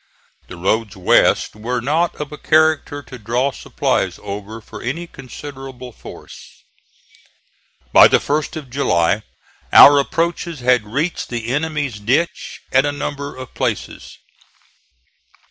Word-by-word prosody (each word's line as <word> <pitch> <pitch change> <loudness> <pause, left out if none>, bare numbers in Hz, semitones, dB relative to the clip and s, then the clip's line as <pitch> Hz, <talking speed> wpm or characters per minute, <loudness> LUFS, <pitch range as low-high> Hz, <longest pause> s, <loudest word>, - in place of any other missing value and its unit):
The 90 - -10
roads 105 +3 -1
west 95 - +3
were 120 +4 -3
not 155 +8 0
of 150 -1 -6
a 150 - -8
character 155 -2 +2
to 125 -2 -11
draw 120 +5 0
supplies - - -2
over 105 +2 -6
for 110 - -11
any 160 +8 -3
considerable 135 -3 -10
force. - - -13 1.3
By - - +9
the - - +4
1st 150 +1 -2
of 145 -6 -8
July 100 -7 +1 0.5
our 145 0 +9
approaches 165 +1 -2
had 125 -3 +3
reached 145 +10 -2
the 115 -1 -4
enemy's 145 -6 -2
ditch 130 +11 -1
at 130 +1 +4
a 145 - 0
number 145 0 -5
of 130 -1 -10
places. - - -4
135 Hz, 130 wpm, -19 LUFS, 115-150 Hz, 1.3 s, By